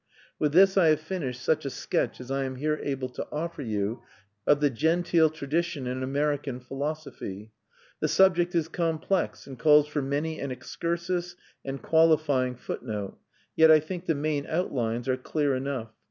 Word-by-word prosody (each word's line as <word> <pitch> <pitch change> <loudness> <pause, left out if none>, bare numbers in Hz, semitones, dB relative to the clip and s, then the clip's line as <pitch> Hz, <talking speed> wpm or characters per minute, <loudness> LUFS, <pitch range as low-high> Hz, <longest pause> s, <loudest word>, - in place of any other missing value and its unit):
With 150 -1 +2
this 195 +3 +6
I 180 -4 +6
have 155 -1 +4
finished 155 -7 -4
such 155 -1 +1
a 140 - -2
sketch - - -2
as 125 +1 -8
I 135 0 0
am 130 0 -4
here 150 +3 -1
able 135 -2 -2
to 125 - -6
offer 165 +1 -4
you 110 -2 -2 0.5
of 145 - +5
the 145 -1 +2
genteel 165 +4 +3
tradition 155 -1 -2
in 125 +1 -3
American 140 -1 -1
philosophy. 135 -6 -6 0.5
The - - +1
subject 175 -2 +3
is 165 -2 +2
complex, 165 +2 -1
and 135 -3 -10
calls 150 +1 +6
for 150 -1 -2
many 145 +4 -2
an 140 - -3
excursus 175 +6 -3 0.3
and 135 -2 -5
qualifying 155 -6 +3
footnote; 105 -4 -5 0.4
yet 160 0 +6
I 155 -1 +8
think 175 +4 -7
the 165 - +2
main 145 0 -1
outlines 120 -8 -1
are 130 -1 +1
clear 145 +1 0
enough. 130 -4 -3
150 Hz, 170 wpm, -27 LUFS, 130-160 Hz, 0.5 s, I